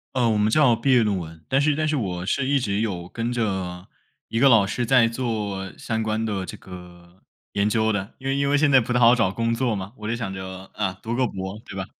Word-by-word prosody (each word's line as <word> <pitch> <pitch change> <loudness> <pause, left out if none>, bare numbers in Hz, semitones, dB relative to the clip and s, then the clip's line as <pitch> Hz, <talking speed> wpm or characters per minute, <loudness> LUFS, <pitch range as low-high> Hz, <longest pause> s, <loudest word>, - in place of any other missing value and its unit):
呃， 120 -2 +2
我 110 - +2
们 105 +1 +2
叫 130 -3 +4
毕 135 +4 0
业 120 -3 +5
论 100 -3 0
文， 80 -2 -8
但 135 +1 +2
是 145 0 +2
但 155 0 0
是 155 - 0
我 90 -7 -3
是 135 +6 0
一 140 -1 +3
直 100 -4 -1
有 90 -6 -3
跟 115 +1 -3
着 95 -6 -3 0.4
一 115 - -1
个 135 - +6
老 110 -5 +6
师 120 +5 -2
在 115 -1 +5
做 105 -6 -3
相 110 0 -2
关 110 +1 -1
的 100 -3 -2
这 - - -8
个 90 -1 -13 0.3
研 100 +1 +1
究 110 0 +2
的， 105 +1 -4
因 135 - -7
为 135 - +1
因 140 0 +1
为 145 - +3
现 145 -1 +3
在 130 - +7
不 120 +1 -3
太 125 - +2
好 120 0 +7
找 115 -6 +2
工 115 +2 -1
作 115 -2 0
嘛， 95 +3 -6
我 105 0 -7
就 115 - -1
想 105 -5 -4
着， 95 0 -8
啊， 95 -3 -2
读 115 +1 -2
个 130 -1 +2
博 95 +2 -6
对 - - -9
吧？ 95 -1 -3
110 Hz, 280 characters per minute, -23 LUFS, 95-125 Hz, 0.4 s, 在